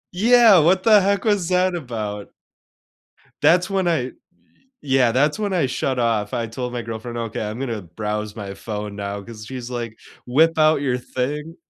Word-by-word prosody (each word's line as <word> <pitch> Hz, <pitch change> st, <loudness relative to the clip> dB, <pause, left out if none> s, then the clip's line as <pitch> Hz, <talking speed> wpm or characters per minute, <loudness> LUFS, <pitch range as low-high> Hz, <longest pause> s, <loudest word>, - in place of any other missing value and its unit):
Yeah! 225 Hz, -2 st, +6 dB
What 185 Hz, +4 st, +3 dB
the 215 Hz, -3 st, +6 dB
heck 200 Hz, +2 st, 0 dB
was 205 Hz, -5 st, +1 dB
that 185 Hz, 0 st, +2 dB
about? 110 Hz, -9 st, -5 dB, 1.1 s
That's 180 Hz, +3 st, +4 dB
when 190 Hz, -2 st, 0 dB
I 160 Hz, -7 st, +1 dB
y 130 Hz, -, -7 dB, 0.7 s
yeah. 130 Hz, -4 st, +2 dB
That's 145 Hz, -, +1 dB
when 205 Hz, -2 st, -1 dB
I 170 Hz, -7 st, +2 dB
shut 130 Hz, 0 st, -2 dB
off, 110 Hz, -3 st, 0 dB
I 115 Hz, -1 st, -1 dB
told 125 Hz, +2 st, -5 dB
my 120 Hz, -, -3 dB
girlfriend, 115 Hz, +1 st, -6 dB
"Okay, 115 Hz, -2 st, -4 dB
I'm 105 Hz, +3 st, -4 dB
gonna 115 Hz, -6 st, -3 dB
browse 105 Hz, +4 st, -5 dB
my 100 Hz, -2 st, -6 dB
phone 105 Hz, 0 st, -6 dB
now," 100 Hz, 0 st, -5 dB
'cause 110 Hz, 0 st, -10 dB
she's 125 Hz, -1 st, -7 dB
like, 120 Hz, -3 st, -5 dB, 0.3 s
"Whip 160 Hz, +6 st, +3 dB
out 155 Hz, -2 st, +4 dB
your 130 Hz, -3 st, 0 dB
thing." 150 Hz, +6 st, -4 dB
125 Hz, 180 wpm, -21 LUFS, 110-170 Hz, 1.1 s, Yeah